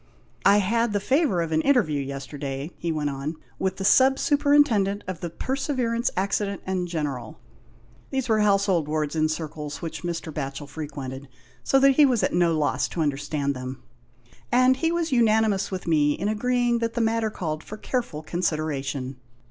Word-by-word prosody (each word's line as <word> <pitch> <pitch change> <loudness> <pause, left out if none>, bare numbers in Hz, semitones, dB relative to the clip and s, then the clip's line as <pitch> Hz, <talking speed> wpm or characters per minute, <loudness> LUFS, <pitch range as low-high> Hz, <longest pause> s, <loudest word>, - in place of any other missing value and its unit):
" - - -35
I 200 - +7
had 225 +3 +1
the 205 - +1
favour 260 - +2
of 165 - -5
an 155 0 +2
interview 160 - +2
yesterday," 140 +2 -5
he 170 - -2
went 150 -2 -1
on, 140 +4 -4 0.2
"with 190 -1 0
the 195 - -3
Sub 260 +6 +6
Superin 290 +1 +4
tendent 205 -5 0
of 185 -3 -4
the 175 - -4
Perseverance 250 - -1
Accident 200 +1 -1
and 185 -1 -1
General 145 -9 -4 0.7
(these 265 -2 -2
were 220 -2 +3
household 195 -6 +2
Tvords 150 0 -1
in 155 0 +2
circles 150 -2 -5
which 160 -1 -5
Mr. 170 -2 -4
Batchel 140 0 -5
frequented, 140 -3 -7 0.4
so 270 - +3
that 275 0 +5
he 295 -2 +7
was 245 -4 +1
at - - +1
no 170 -2 +3
loss 150 -2 +1
to 170 - -4
understand 145 -1 -1
them), 130 +1 -7 0.7
and 255 +1 +4
he 325 +3 +1
was 335 -2 -1
unani 220 -3 +4
mous 195 -1 -2
with 185 -2 -5
me 150 -3 +3
in 195 - -3
agreeing 240 +2 +1
that 230 0 -2
the - - 0
matter 225 -1 +1
called 160 -6 -4
for 215 - -8
careful 225 - -3
consideration. 145 -6 -2
180 Hz, 180 wpm, -25 LUFS, 150-230 Hz, 0.7 s, I